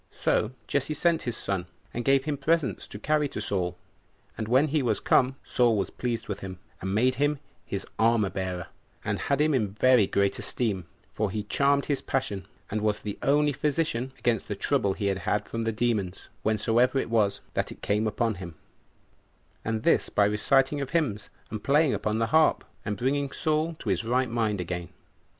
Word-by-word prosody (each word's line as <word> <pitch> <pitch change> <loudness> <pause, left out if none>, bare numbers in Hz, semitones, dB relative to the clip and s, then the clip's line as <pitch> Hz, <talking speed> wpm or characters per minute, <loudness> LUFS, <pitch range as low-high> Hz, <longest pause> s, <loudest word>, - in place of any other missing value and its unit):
So 110 +3 0
Jesse 140 +2 0
sent 165 +1 +2
his 120 -2 -3
son, 95 -3 -2 0.3
and 120 - -2
gave 135 0 +4
him 150 -2 0
presents 160 -1 0
to - - -8
carry 150 +6 +1
to - - -6
Saul. 90 -3 -1 0.6
And 110 - -4
when 130 +6 +4
he 150 +1 +2
was 115 -5 +1
come, 130 +1 +3
Saul 120 -3 +2
was 100 - -1
pleased 120 -2 -3
with 100 -2 -4
him, 95 -1 -7 0.2
and 95 +1 -2
made 125 +4 +3
him 145 0 +2 0.3
his 100 -1 -3
armor 110 -3 +3
bearer, 95 -2 -3 0.4
and - - -1
had 140 -1 0
him 155 0 +3
in 105 -7 0
very 125 -1 +5
great 100 0 +1
esteem; 100 -8 -2 0.3
for 105 -1 0
he 105 +2 -3
charmed 140 +6 +2
his 145 -2 -1
passion, 100 -8 -2 0.2
and 105 +1 -1
was 105 -1 +1
the 105 -1 -5
only 145 +1 +3
physician 140 -3 -1
against 120 -3 0
the - - -3
trouble 100 -1 +1
he 100 - -4
had 100 +2 0
from 115 0 -3
the 115 - +1
demons, 105 -5 -1
whensoever 115 +4 +2
it 125 - -1
was 105 -3 +2
that - - -1
it - - -12
came 105 +2 +1
upon 115 +1 0
him, 85 -3 -7 1.1
and 110 0 -2
this - - +3
by 100 - +3
reciting 135 +7 +2
of 135 - -3
hymns, 140 - -1 0.2
and 105 -1 -5
playing 145 +1 +4
upon 105 0 -1
the 115 - +2
harp, 160 0 +4 0.2
and 105 -2 -3
bringing 140 +4 0
Saul 160 +1 0
to 110 - -5
his 95 +2 +1
right 125 +1 +1
mind 110 -4 0
again. 90 0 -4
115 Hz, 190 wpm, -27 LUFS, 105-135 Hz, 1.1 s, very